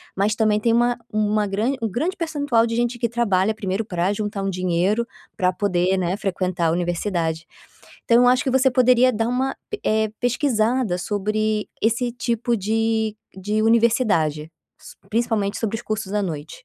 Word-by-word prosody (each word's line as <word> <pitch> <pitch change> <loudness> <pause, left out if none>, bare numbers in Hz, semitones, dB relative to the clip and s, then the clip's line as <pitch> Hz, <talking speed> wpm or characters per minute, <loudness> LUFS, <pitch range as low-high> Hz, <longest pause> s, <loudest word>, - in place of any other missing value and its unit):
mas 205 +2 +1
também 215 -2 +2
tem 230 +1 +1
uma 240 +1 +2
uma 210 0 +1
grande 220 +8 -1
um 225 - -1
grande 310 - -2
percentual 285 -9 +1
de 230 - -3
gente 240 0 -1
que 235 - 0
trabalha 220 -3 +1
primeiro 200 0 -2
pra 180 0 -1
juntar 205 -1 -3
um 195 - -1
dinheiro 185 +5 0 0.3
pra 180 0 +2
poder, 185 -1 0
né, 180 0 0
frequentar 185 -2 -2 0.2
a - - +2
universidade. 170 -1 -2 0.6
Então, 235 - +4
eu 245 - +5
acho 250 +1 +3
que 265 - 0
você 265 +1 +3
poderia 255 0 +4
dar 225 +1 -1
uma 260 +2 -1
p 425 - -6
eh, 220 0 +2
pesquisada 240 - +1
sobre 215 +2 -1
esse 235 +2 +1
tipo 235 0 -1
de 220 +1 0 0.2
de 210 +3 -1
universidade, 220 - +2 0.3
s - - -13
principalmente 220 -3 0
sobre 225 -1 -2
os 230 - -8
cursos 215 -3 -4
à 210 -1 0
noite. 160 -4 -6
215 Hz, 175 wpm, -22 LUFS, 195-235 Hz, 0.6 s, eu